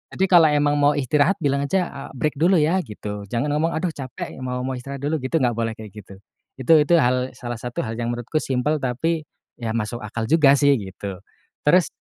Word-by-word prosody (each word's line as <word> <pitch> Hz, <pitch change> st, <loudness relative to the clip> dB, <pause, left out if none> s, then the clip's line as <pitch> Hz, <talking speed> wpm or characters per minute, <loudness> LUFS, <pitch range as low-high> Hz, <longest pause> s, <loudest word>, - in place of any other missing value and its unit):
Jadi 190 Hz, -, +2 dB
kalau 165 Hz, -3 st, +7 dB
emang 145 Hz, 0 st, +2 dB
mau 145 Hz, +1 st, +4 dB
istirahat, 145 Hz, +6 st, +2 dB
bilang 140 Hz, 0 st, +1 dB
aja, 180 Hz, +3 st, 0 dB
eee, 140 Hz, -1 st, -8 dB
"Break 150 Hz, +3 st, -1 dB
dulu 180 Hz, +4 st, +4 dB
ya," 160 Hz, +5 st, +2 dB
gitu. 105 Hz, -1 st, -7 dB
Jangan 120 Hz, +7 st, -1 dB
ngomong, 160 Hz, +3 st, +1 dB
"Aduh 170 Hz, +1 st, -1 dB
capek, 130 Hz, -3 st, -7 dB
mau 125 Hz, 0 st, -3 dB
mau 130 Hz, -, -2 dB
istirahat 140 Hz, +2 st, -8 dB
dulu," 155 Hz, +1 st, 0 dB
gitu, 130 Hz, +5 st, -1 dB
gak 120 Hz, -, +3 dB
boleh 115 Hz, -1 st, -1 dB
kayak 110 Hz, -3 st, -10 dB
gitu. 100 Hz, -2 st, -12 dB, 0.4 s
Itu 145 Hz, +5 st, +4 dB
itu 160 Hz, +4 st, +4 dB
hal 125 Hz, -2 st, +1 dB
salah 120 Hz, -2 st, -6 dB
satu 120 Hz, 0 st, -4 dB
hal 115 Hz, 0 st, -5 dB
yang 120 Hz, 0 st, -1 dB
menurutku 120 Hz, +6 st, -2 dB
simpel, 140 Hz, +4 st, -1 dB
tapi 150 Hz, +5 st, -2 dB, 0.3 s
ya 115 Hz, -1 st, -3 dB
masuk 115 Hz, +1 st, -3 dB
akal 110 Hz, +2 st, -4 dB
juga 150 Hz, -3 st, +6 dB
sih 140 Hz, 0 st, +4 dB
gitu. 95 Hz, -1 st, -7 dB, 0.5 s
Terus 180 Hz, +2 st, +5 dB
135 Hz, 210 wpm, -22 LUFS, 120-155 Hz, 0.5 s, kalau